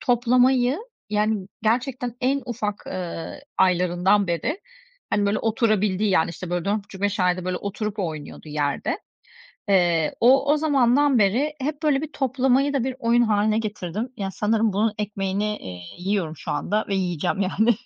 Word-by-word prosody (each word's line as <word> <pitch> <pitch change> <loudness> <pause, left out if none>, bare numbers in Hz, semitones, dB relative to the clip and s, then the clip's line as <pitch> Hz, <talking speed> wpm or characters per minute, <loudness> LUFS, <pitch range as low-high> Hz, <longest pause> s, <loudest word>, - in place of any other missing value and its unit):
toplamayı, 250 +2 +3 0.3
yani, 210 -2 0 0.2
gerçekten 245 +1 -1
en 270 +2 +1
ufak, 210 -4 -3
eee, 175 - -5 0.2
aylarından 180 +2 +3
beri, 230 - -2 0.5
hani, 205 -1 +2
böyle 205 +2 +1
oturabildiği, 215 -3 +1
yani, 165 -2 +2
işte, 175 +1 -7
böyle, 175 -1 -1
4,5-5 200 -1 -2
ayda 180 0 +1
böyle 185 0 -1
oturup 210 +2 -4
oynuyordu 155 -3 -5
yerde. 145 -1 -1 0.7
Eee, 175 -4 +3
o 270 +4 +5
o - - +2
zamandan 280 -3 +3
beri 245 +10 +2
hep 300 +3 -3
böyle 285 -2 +2
bir 310 -1 -5
toplamayı 265 +1 +1
da 265 -4 +1
bir 260 -1 -2
oyun 235 0 +3
hâline 215 -1 +2
getirdim. 215 +1 -3
Yani, 195 -1 -3
sanırım 215 0 +1
bunun 215 +2 +1
ekmeğini, 210 0 -2
eee, 90 -1 -8 0.2
yiyorum 180 -4 -2
şu - - -5
anda 205 +9 -1
ve 200 - -1
yiyeceğim, 180 +1 -1
yani. 220 +5 +2
210 Hz, 150 wpm, -24 LUFS, 185-245 Hz, 0.7 s, o